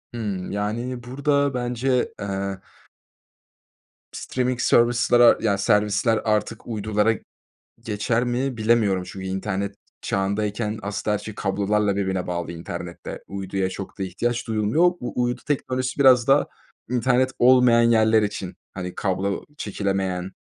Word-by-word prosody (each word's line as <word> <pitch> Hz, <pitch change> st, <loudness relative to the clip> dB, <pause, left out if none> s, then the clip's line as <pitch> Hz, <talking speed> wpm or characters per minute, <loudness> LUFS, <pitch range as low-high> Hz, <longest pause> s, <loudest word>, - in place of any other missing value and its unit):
Hıı, 100 Hz, -5 st, -3 dB
yani, 115 Hz, +5 st, -3 dB
burada 140 Hz, +2 st, 0 dB
bence, 125 Hz, +1 st, 0 dB
eee 100 Hz, -1 st, -3 dB, 1.5 s
streaming 125 Hz, -1 st, -2 dB
service'lere 120 Hz, 0 st, +5 dB
yani, 100 Hz, -3 st, +1 dB
servisler 105 Hz, +2 st, +2 dB
artık 110 Hz, +1 st, -1 dB
uydulara 110 Hz, -1 st, +1 dB, 0.7 s
geçer 115 Hz, +3 st, -1 dB
mi 125 Hz, +1 st, -1 dB
bilemiyorum 110 Hz, -4 st, +2 dB
çünkü 95 Hz, +1 st, -8 dB
internet 95 Hz, +1 st, -3 dB, 0.3 s
çağındayken, 105 Hz, +2 st, -1 dB
aslında, 100 Hz, +1 st, -2 dB
her 105 Hz, -, 0 dB
şey 110 Hz, -, -8 dB
kablolarla 100 Hz, +1 st, 0 dB
birbirine 95 Hz, -2 st, -1 dB
bağlı 85 Hz, -1 st, -3 dB
internette. 85 Hz, -1 st, -7 dB
Uyduya 95 Hz, -1 st, -2 dB
çok 100 Hz, +2 st, -8 dB
da -, -, -1 dB
ihtiyaç 120 Hz, +7 st, -2 dB
duyulmuyor. 110 Hz, +9 st, +1 dB
U 125 Hz, -8 st, 0 dB
uydu 120 Hz, 0 st, -2 dB
teknolojisi 130 Hz, -2 st, -2 dB
biraz 130 Hz, -3 st, +6 dB
daha 135 Hz, +2 st, +4 dB, 0.4 s
internet 125 Hz, +1 st, +2 dB
olmayan 125 Hz, -1 st, +6 dB
yerler 110 Hz, -1 st, +4 dB
için, 95 Hz, -3 st, -4 dB, 0.2 s
hani, 90 Hz, -1 st, -6 dB
kablo 95 Hz, +1 st, -1 dB
çekilemeyen, 95 Hz, -2 st, -2 dB
110 Hz, 120 wpm, -23 LUFS, 100-120 Hz, 1.5 s, biraz